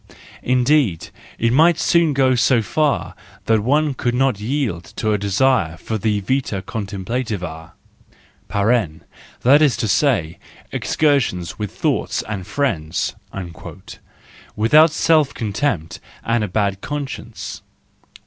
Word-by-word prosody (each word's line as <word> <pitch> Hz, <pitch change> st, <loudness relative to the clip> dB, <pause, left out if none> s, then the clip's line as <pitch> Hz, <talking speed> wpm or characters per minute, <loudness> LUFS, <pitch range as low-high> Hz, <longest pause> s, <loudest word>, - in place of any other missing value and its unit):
Indeed, 125 Hz, -, +1 dB, 0.3 s
it 115 Hz, +1 st, +1 dB
might 160 Hz, +4 st, +5 dB
soon 170 Hz, -3 st, +2 dB
go 130 Hz, -1 st, +3 dB
so 120 Hz, -1 st, +3 dB
far 150 Hz, +2 st, 0 dB, 0.3 s
that 110 Hz, -1 st, +3 dB
one 145 Hz, +6 st, +1 dB
could 120 Hz, -1 st, -1 dB
not 130 Hz, -5 st, +1 dB
yield 110 Hz, -, -2 dB
to 110 Hz, -, -1 dB
the 105 Hz, -, +2 dB
desire 100 Hz, -3 st, +1 dB
for 110 Hz, +6 st, -4 dB
the 105 Hz, -1 st, 0 dB
vita 110 Hz, -3 st, -1 dB
contemplativa 100 Hz, -6 st, -5 dB, 0.8 s
(that 110 Hz, -, +1 dB
is 145 Hz, -6 st, +3 dB
to 120 Hz, -2 st, -1 dB
say, 105 Hz, -, +1 dB, 0.3 s
excursions 125 Hz, -, 0 dB
with 105 Hz, -2 st, -3 dB
thoughts -, -, -1 dB
and 100 Hz, -4 st, -6 dB
friends), 85 Hz, -, -1 dB, 1.4 s
without 150 Hz, +10 st, +5 dB
self¬ 155 Hz, -2 st, +2 dB
contempt 100 Hz, -, -2 dB, 0.3 s
and 115 Hz, -1 st, +1 dB
a -, -, -1 dB
bad 100 Hz, 0 st, -1 dB
conscience. 145 Hz, -2 st, -6 dB
115 Hz, 115 wpm, -20 LUFS, 100-140 Hz, 1.4 s, might